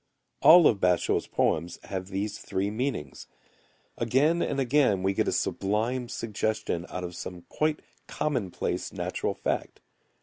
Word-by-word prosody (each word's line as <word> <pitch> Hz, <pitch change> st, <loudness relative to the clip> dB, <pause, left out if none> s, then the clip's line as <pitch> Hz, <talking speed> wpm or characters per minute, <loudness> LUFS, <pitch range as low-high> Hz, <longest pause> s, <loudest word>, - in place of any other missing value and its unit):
All 170 Hz, 0 st, +9 dB
of 105 Hz, -, +4 dB
Basho[u]'s 90 Hz, -2 st, +2 dB
poems 85 Hz, +2 st, 0 dB
have 95 Hz, -1 st, -5 dB
these 100 Hz, +2 st, -3 dB
three 100 Hz, +2 st, -2 dB
meanings. 120 Hz, -, -3 dB, 0.7 s
Again 140 Hz, +9 st, +2 dB
and 140 Hz, -, -1 dB
again 130 Hz, -7 st, +3 dB
we 95 Hz, +1 st, +2 dB
get -, -, 0 dB
a -, -, +2 dB
sublime 115 Hz, +5 st, -1 dB
suggestion 110 Hz, -6 st, -2 dB
out 90 Hz, -, -5 dB
of 90 Hz, 0 st, -6 dB
some 90 Hz, 0 st, -7 dB
quite 155 Hz, 0 st, 0 dB, 0.3 s
commonplace 120 Hz, -12 st, -2 dB
natural -, -, -2 dB
fact. -, -, -3 dB
105 Hz, 135 wpm, -27 LUFS, 95-130 Hz, 0.7 s, All